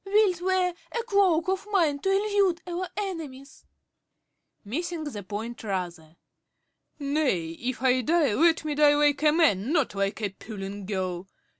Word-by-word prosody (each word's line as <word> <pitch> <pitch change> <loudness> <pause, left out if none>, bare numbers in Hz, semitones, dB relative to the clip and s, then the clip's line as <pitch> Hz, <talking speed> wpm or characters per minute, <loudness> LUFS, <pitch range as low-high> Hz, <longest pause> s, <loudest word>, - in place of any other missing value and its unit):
Wilt 390 -3 +2
wear 370 -1 +1 0.3
a - - -2
cloak 385 -7 +2
of 380 +2 -1
mine 320 -8 +2
to 385 - -1
elude 395 -3 +2
our 360 +1 -3
enemies? 315 -9 -6 1.0
~Roger~ - - -13
(missing 340 +5 -3
the 265 -9 -5
point 220 +5 -6
rather). 175 -6 -4 0.8
Nay, 280 - 0
if 245 +9 -5
I 255 -1 +3
die, 305 -2 +2
let 325 +5 +3
me 300 - -1
die 290 0 +5
like 290 -1 +2
a 305 -1 +5
man, 290 - +2
not 310 - +1
like 200 +1 -1
a 205 - +1
puling 195 -1 -8
girl. 185 -2 -3
295 Hz, 155 wpm, -26 LUFS, -, 1.0 s, die